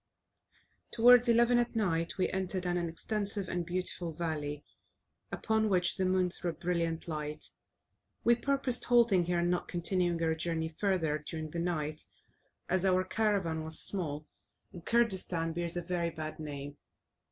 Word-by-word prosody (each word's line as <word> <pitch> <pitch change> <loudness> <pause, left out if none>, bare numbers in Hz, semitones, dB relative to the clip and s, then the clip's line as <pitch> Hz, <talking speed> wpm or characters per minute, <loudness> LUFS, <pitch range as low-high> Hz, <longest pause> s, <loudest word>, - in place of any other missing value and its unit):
Towards 245 +1 +6
11 235 +1 +4
at 240 0 -1
night 170 -6 0
we 185 - +2
entered 185 -1 -2
an 175 -1 -1
extensive 200 +3 -2
and 175 -1 -2
beautiful 175 -1 -1
valley, 150 -3 -3 0.7
upon 220 -1 0
which 180 -2 +1
the 190 - 0
moon 185 -1 +1
threw 175 - -4
a - - -3
brilliant 170 0 -2
light. 150 -1 -4 0.7
We 235 - +5
purposed 265 0 +1
halting 235 -7 +4
here, 175 0 0
and 175 +1 +1
not 180 - -1
continuing 175 -1 0
our 160 0 +2
journey 160 0 -2
further 165 -3 0
during 155 -1 -5
the 170 - -4
night, 155 -3 -2 0.7
as 185 0 0
our 185 -1 +3
caravan 190 -6 0
was 160 0 +2
small, 155 -6 0 0.5
and 175 - -10
Kurdistan 185 -8 +1
bears 170 0 -2
a 175 - -3
very 170 -1 -1
bad 155 -1 -6
name. 145 -1 -6
175 Hz, 150 wpm, -31 LUFS, 160-195 Hz, 0.7 s, Towards